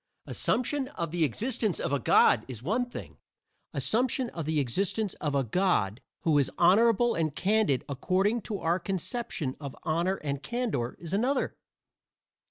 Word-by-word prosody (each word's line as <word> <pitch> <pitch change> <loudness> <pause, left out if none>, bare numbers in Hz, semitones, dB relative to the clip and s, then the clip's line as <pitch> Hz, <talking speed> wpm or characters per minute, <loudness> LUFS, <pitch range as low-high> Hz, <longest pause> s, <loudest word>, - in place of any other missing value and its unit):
Assumption 260 +2 0
of 170 - -4
the 170 -1 +1
existence 215 - 0
of - - -2
a 140 - +2
God 115 -1 +5
is 120 -3 -7
one 235 - 0
thing; - - -9 0.5
assumption 250 +2 +1
of 165 -3 -5
the 155 0 +1
existence 190 - -1
of 145 -2 -1
a 135 - +2
God 120 - +1 0.2
who 155 -3 +3
is 135 - +1
honorable 230 +6 +4
and 155 -3 -1
candid 200 - +2
according 190 - +1
to 205 0 -4
our 170 0 0
conception 190 - -3
of 140 -3 -7
honor 170 +4 +1
and 140 -5 -4
candor 235 - -2
is 170 0 -7
another. 255 +7 +1
180 Hz, 155 wpm, -29 LUFS, 145-225 Hz, 0.5 s, God